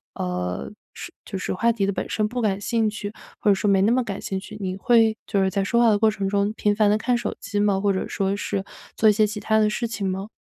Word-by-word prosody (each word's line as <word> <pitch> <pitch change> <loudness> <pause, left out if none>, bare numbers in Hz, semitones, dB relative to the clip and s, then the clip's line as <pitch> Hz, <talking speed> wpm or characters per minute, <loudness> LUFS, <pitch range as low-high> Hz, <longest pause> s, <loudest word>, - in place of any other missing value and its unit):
呃， 90 -5 -3 0.2
是 - - -8
就 195 - -5
是 185 - -3
话 230 +5 +2
题 205 -4 0
的 200 - 0
本 - - -4
身 215 -1 0
不 245 +2 -3
感 200 -2 0
兴 225 +1 0
趣， 210 0 -6 0.3
或 210 - +1
者 200 - +5
说 205 +1 0
没 195 -1 +4
那 220 - +3
么 255 0 +2
感 200 -4 -5
兴 190 - -3
趣， 210 +2 -10
你 185 -1 -3
会 225 +2 +3
就 200 - +1
是 190 - +2
在 195 0 -1
说 235 +4 +2
话 235 - +5
的 210 - +4
过 220 -1 +4
程 200 -2 -3
中 200 +1 +1
频 210 -2 +1
繁 210 -1 +3
地 210 - +3
看 245 +2 +1
手 - - -3
机 205 -1 -3
吗？ 200 -2 +2
或 200 -1 +1
者 190 - -2
说 195 0 -1
是 200 -1 -3 0.3
做 220 - +5
一 - - +7
些 215 +1 +3
其 210 0 -5
他 220 +2 +1
的 210 0 +3
事 235 +2 -2
情 205 -3 -3
吗？ 195 +3 -4
205 Hz, 305 characters per minute, -23 LUFS, 195-220 Hz, 0.3 s, 一